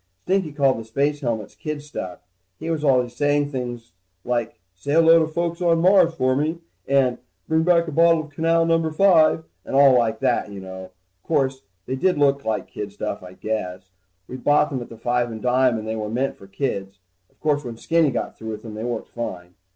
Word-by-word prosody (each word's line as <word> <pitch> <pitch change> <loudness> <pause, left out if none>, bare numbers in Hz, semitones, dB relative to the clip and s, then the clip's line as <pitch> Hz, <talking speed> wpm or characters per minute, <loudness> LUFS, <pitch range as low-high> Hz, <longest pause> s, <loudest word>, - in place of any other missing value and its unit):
Stinky 190 -4 0
called 140 -4 +2
the - - -6
space 140 +6 -1
helmets 115 -5 -3
kid 150 -1 -5
stuff. 95 -13 -7 0.4
He 165 - -3
was 155 -2 -2
always 125 -4 +2
saying 145 +1 +1
things 120 - -5 0.3
like 120 -4 -2
say 120 +10 -4
hello 165 +1 +6
to 160 - +2
the - - -11
folks 170 +1 -2
on 170 -2 +3
Mars 180 -1 +4
for 130 -4 +1
me, 155 +4 0 0.3
and 135 -3 +2 0.3
bring 160 0 +2
back 170 0 +3
a - - -4
bottle 165 +1 +4
of 155 - -14
canal 165 +2 +2
number 165 -1 +2
five, 160 -2 +4 0.2
and - - -5
all 135 -1 +7
like 115 -2 +1
that, - - +1
you 100 - -7
know. 95 0 -9 0.3
Course, 135 - 0 0.2
they 130 - -3
did 180 +7 +1
look 140 -1 +2
like 110 -1 -2
kid 105 -1 -6
stuff, 105 0 -4
I 90 0 -11
guess. 95 -3 -4 0.4
We 130 - -7
bought 145 +3 +2
them 130 -3 -3
at 120 - -8
the 115 - -11
five 120 +1 0
and 110 - -6
dime, 125 0 +2
and 110 0 -6
they 110 - -2
were 105 -1 -4
meant 130 +5 -1
for 95 - -15
kids. 100 -2 -3 0.3
Of - - -36
course 150 -1 0
when 120 -3 -7
Skinny 165 +3 +2
got - - -3
through 110 - -6
with 105 - -8
them, 110 -2 -8
they 110 +1 -6
worked 120 -2 -4
fine. 90 -7 -6
135 Hz, 215 wpm, -22 LUFS, 110-155 Hz, 0.4 s, all